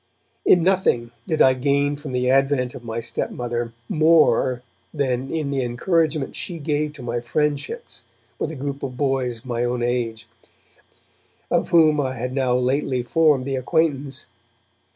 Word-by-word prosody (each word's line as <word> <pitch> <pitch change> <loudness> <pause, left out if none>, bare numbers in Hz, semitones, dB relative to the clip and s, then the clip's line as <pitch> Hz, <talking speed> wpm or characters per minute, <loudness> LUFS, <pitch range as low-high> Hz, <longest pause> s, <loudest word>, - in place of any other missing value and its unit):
In 175 - +6
nothing 175 -11 +2 0.2
did 160 -4 +3
I 130 - +6
gain 140 +2 +1
from 145 -1 -8
the 125 0 0
advent 135 -1 +2
of 120 - -10
my 115 0 -4
stepmother 120 0 -3 0.2
more 155 -5 +3 0.3
than 135 -3 -1
in 155 -3 -2
the 135 -1 0
encouragement 155 +4 0
she 175 - -4
gave 150 0 -1
to 140 -4 -10
my 120 0 -2
friendships 150 - -2 0.4
with - - -1
a 160 - -6
group 140 0 -4
of 130 -2 -5
boys 130 -3 0
of - - -26
my 120 -1 -2
own 120 0 -1
age, 115 -2 -2 1.2
of - - +1
whom 155 -3 +5
I 130 -1 -2
had 125 +1 -4
now 130 -2 +1
lately 130 0 0
formed 145 0 +3
the 135 -1 -2
acquaintance. 140 -1 -1
135 Hz, 155 wpm, -22 LUFS, 125-150 Hz, 1.2 s, In